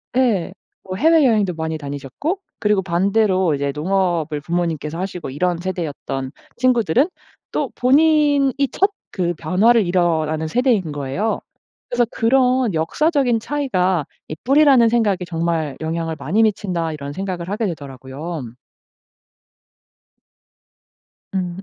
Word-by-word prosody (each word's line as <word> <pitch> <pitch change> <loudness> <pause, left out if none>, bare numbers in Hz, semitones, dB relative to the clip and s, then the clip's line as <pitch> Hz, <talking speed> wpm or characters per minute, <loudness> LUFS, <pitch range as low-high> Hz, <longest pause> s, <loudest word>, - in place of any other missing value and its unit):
예. 235 -9 +1 0.3
뭐 185 - -6
해외여행도 240 - +3
많이 160 0 -3
다니셨고 145 - -4 0.2
그리고 210 -2 +2
반대로 190 -1 +2
이제 140 0 -1
농업을 165 -2 0
부모님께서 165 -1 -2
하시고 185 -5 -4
이런 175 +6 0
세대였던 150 -7 -4 0.3
친구들은 250 - +2 0.4
또 - - -1
본인이 285 0 +4 0.2
첫 390 +2 +2 0.2
그 175 -2 0
변화를 200 +8 +3
일어나는 160 -3 +1
세대인 225 - +1
거예요. 145 +10 -2 0.5
그래서 245 0 +1
'그런 250 -1 +2
역사적인 245 - +1
차이가 190 - 0 0.2
이 - - -5
뿌리라는 270 -3 +5
생각에 225 -5 +2
정말 165 -4 -2
영향을 165 0 -2
많이 205 +8 0
미친다.' 185 -7 0
이런 140 -1 -6
생각을 185 -1 -4
하게 210 +3 -1
되더라고요. 145 +1 -6 2.9
음. 180 -2 -2
185 Hz, 290 characters per minute, -20 LUFS, 160-235 Hz, 2.9 s, 뿌리라는